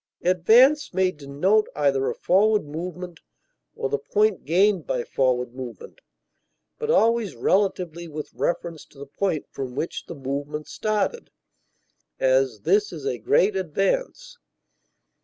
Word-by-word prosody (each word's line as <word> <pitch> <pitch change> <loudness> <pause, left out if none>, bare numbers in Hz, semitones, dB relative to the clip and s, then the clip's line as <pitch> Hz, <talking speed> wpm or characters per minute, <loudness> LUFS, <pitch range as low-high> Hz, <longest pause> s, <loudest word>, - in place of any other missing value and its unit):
Advance 225 - +4
may 185 -1 +2
denote 150 +8 0
either 135 -2 +1
a - - -4
forward 210 0 +2
movement 175 +3 -7 0.6
or - - -2
the 140 +1 -1
point 210 +7 0
gained 185 +2 +2
by 125 - -1
forward 125 -2 0
movement, 130 - -9 0.8
but 455 -1 -3
always 230 - +2
relatively 175 - 0
with 150 -1 -7
reference 170 -2 -3
to - - -22
the 140 - -8
point 160 +2 -2
from 130 -2 -6
which 160 - -4
the 170 - -7
movement 145 +2 -5
started; 215 - -2 0.9
as, 130 -4 +2
this 205 - +2
is 160 -4 -8
a 120 - -2
great 190 - +2
advance. 485 - -2
170 Hz, 130 wpm, -24 LUFS, 140-205 Hz, 0.9 s, Advance